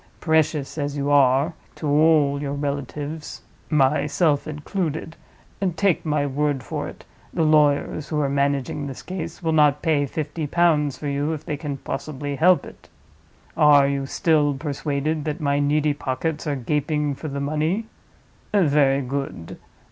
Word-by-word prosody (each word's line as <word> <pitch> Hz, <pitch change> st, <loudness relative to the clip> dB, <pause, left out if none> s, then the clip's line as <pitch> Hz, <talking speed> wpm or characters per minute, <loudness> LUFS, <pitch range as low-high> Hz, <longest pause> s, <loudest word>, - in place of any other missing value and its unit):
Precious 160 Hz, -2 st, +1 dB
as 145 Hz, 0 st, -2 dB
you 140 Hz, +1 st, -1 dB
are 140 Hz, +3 st, +4 dB, 0.2 s
to -, -, -7 dB
all 145 Hz, -1 st, +3 dB
your 140 Hz, -1 st, -3 dB
relatives 145 Hz, +2 st, -5 dB, 0.3 s
(myself 150 Hz, +1 st, +2 dB
included), 160 Hz, +1 st, -4 dB, 0.6 s
take 195 Hz, -3 st, +1 dB
my 150 Hz, -2 st, 0 dB
word 145 Hz, -1 st, -1 dB
for -, -, -4 dB
it, -, -, -11 dB, 0.3 s
the 165 Hz, -, 0 dB
lawyers 150 Hz, -1 st, +2 dB
who 150 Hz, -, -1 dB
are 145 Hz, -, +1 dB
managing 140 Hz, 0 st, -1 dB
this 135 Hz, -, -8 dB
case 170 Hz, -2 st, -6 dB
will 165 Hz, -, +1 dB
not 150 Hz, -2 st, +3 dB
pay 150 Hz, -4 st, +2 dB
fifty 155 Hz, +2 st, -4 dB
pounds 150 Hz, -4 st, +2 dB
for 150 Hz, -, -5 dB
you 145 Hz, +2 st, -1 dB
if 155 Hz, -, -7 dB
they 150 Hz, -, -2 dB
can 145 Hz, -1 st, -5 dB
possibly 145 Hz, +1 st, -5 dB
help 175 Hz, +5 st, +4 dB
it. -, -, -14 dB, 0.7 s
Are 145 Hz, -3 st, +6 dB
you 140 Hz, -1 st, -2 dB
still 150 Hz, -3 st, +2 dB
persuaded 145 Hz, +1 st, -2 dB
that 155 Hz, +2 st, -3 dB
my 140 Hz, -2 st, +1 dB
needy 145 Hz, +1 st, +2 dB
pockets 145 Hz, +3 st, -3 dB
are 145 Hz, -, 0 dB
gaping 150 Hz, +3 st, -1 dB
for 155 Hz, -, -7 dB
the 140 Hz, -1 st, -4 dB
money? 155 Hz, +9 st, -1 dB, 0.7 s
Very 145 Hz, -8 st, +3 dB
good. 130 Hz, -10 st, -5 dB
145 Hz, 150 wpm, -23 LUFS, 140-155 Hz, 0.7 s, Are